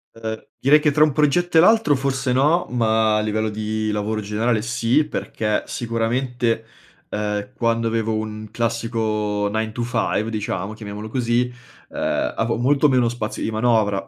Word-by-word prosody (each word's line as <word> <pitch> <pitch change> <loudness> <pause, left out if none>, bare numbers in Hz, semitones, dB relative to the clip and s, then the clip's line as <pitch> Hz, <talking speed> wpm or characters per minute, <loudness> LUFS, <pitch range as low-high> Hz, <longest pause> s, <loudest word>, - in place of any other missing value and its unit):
Uhm, 110 -1 -6
direi 150 +3 +5
che 150 0 +2
tra 150 +1 +4
un 155 - +3
progetto 160 +4 +2
e - - +9
l'altro 220 -5 +5
forse 130 -1 -1
no, 150 +7 +2
ma 110 -2 +2
a - - +2
livello 110 0 -1
di 110 0 -2
lavoro 105 +1 -2
generale 110 +2 0
sì 120 +5 +1
perché 105 -7 -2
sicuramente, 115 0 -1 0.4
uhm, 105 +2 -2
quando 115 -1 0
avevo 115 0 0
un 110 0 -5
classico 110 -3 -1
nine 110 0 -1
to 120 - -5
five 115 -2 -1
diciamo, 105 -2 -3
chiamiamolo 105 0 -7
così, 125 0 0 0.4
uhm, - - -1
avevo 115 0 0
molto 140 +4 +3
meno 125 -3 +3
spazio 115 -3 -4
di - - -1
manovra. 110 -3 +1
115 Hz, 160 wpm, -21 LUFS, 110-125 Hz, 0.4 s, e